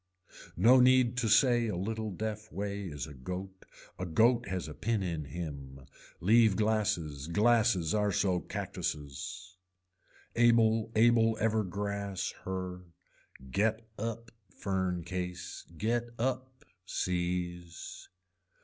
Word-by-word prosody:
No 120 +8 +7
need 125 -1 +5
to 120 -2 +1
say 120 +1 +4
a 105 - -2
little 110 +4 -3
deaf 105 +2 -5
way 100 0 -3
is 75 -4 -5
a 75 - -10
goat, 90 +8 -7 0.3
a 90 - -2
goat 115 +8 +3
has 95 -3 -3
a 75 - -7
pin 110 +4 -1
in 85 -5 -3
him. 70 -5 -7 0.3
Leave 110 +1 +5
glasses, 105 -10 0
glasses 105 -2 +3
are 105 -1 +2
so 95 -1 +1
cactuses. 85 +6 -5 0.8
Able 115 -2 +4
able 115 0 +4
ever 110 0 +2
grass 100 0 -3
her, 90 -1 -4 0.7
get 110 - 0
up 115 +1 -4 0.2
fern 95 -3 -2
case, 90 0 -5
get 120 +4 0
up 130 +1 -3 0.2
seize. 90 -1 -3
100 Hz, 115 wpm, -31 LUFS, 90-115 Hz, 0.8 s, No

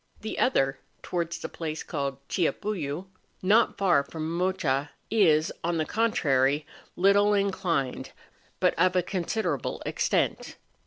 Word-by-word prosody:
The 220 - -4
other, 135 - +2 0.2
towards 170 -2 -2
the - - -5
place 160 -1 -5
called 140 -3 -4
Chillapullu, 175 -3 -2 0.4
not 215 +5 +4
far 175 -8 +3
from 160 +3 -5
Mocha, 170 -6 0 0.2
is, 165 -8 +4
on 170 0 0
the 155 - 0
contrary, 145 - +1 0.3
little 200 +2 +4
inclined, 180 -9 -1 0.5
but - - +3
of 185 +1 +3
a 180 - +3
considerable 175 - -2
extent. - - -1
170 Hz, 120 wpm, -27 LUFS, 145-195 Hz, 0.5 s, not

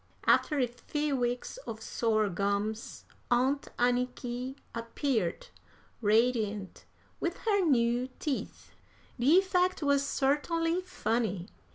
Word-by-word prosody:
After 300 - +4
a 260 - +3
few 280 +5 -2
weeks 245 - -2
of 220 - -5
sore 220 -1 +1
gums, 200 +3 -2 0.2
Aunt 260 +4 +2
Anniky 245 +1 -1 0.2
appeared, 230 - -2 0.5
radiant 215 -2 +1 0.3
with 345 +2 -2
her 405 -3 +3
new 245 -4 +2
teeth. 290 -4 -4 0.5
The 280 +8 +6
effect 370 -2 +2
was 280 -1 +3
certainly 330 +5 +1
funny. 225 - -2
245 Hz, 100 wpm, -30 LUFS, 225-290 Hz, 0.5 s, The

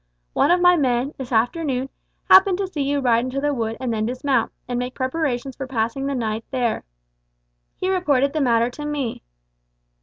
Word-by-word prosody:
One - - +3
of 355 - +4
my 355 0 +6
men, 260 0 0
this 265 -2 -6
afternoon, 260 +2 0 0.4
happened 380 -1 +7
to 395 - -1
see 350 -6 -4
you 280 +1 0
ride 235 -2 +3
into 255 +2 -3
the 290 +1 0
wood 225 -3 -2
and 250 -3 -2
then 215 0 -1
dismount 255 -1 0 0.2
and 245 -1 -2
make 250 +1 -4
preparations 260 -1 -2
for 270 - -6
passing 250 +2 -2
the 280 - -1
night 225 -2 -2
there. 245 -4 -1 0.9
He 370 - -3
reported 290 -8 +2
the 310 - 0
matter 235 -2 +2
to 295 - -8
me. 290 -5 -3
265 Hz, 185 wpm, -22 LUFS, 240-290 Hz, 0.9 s, happened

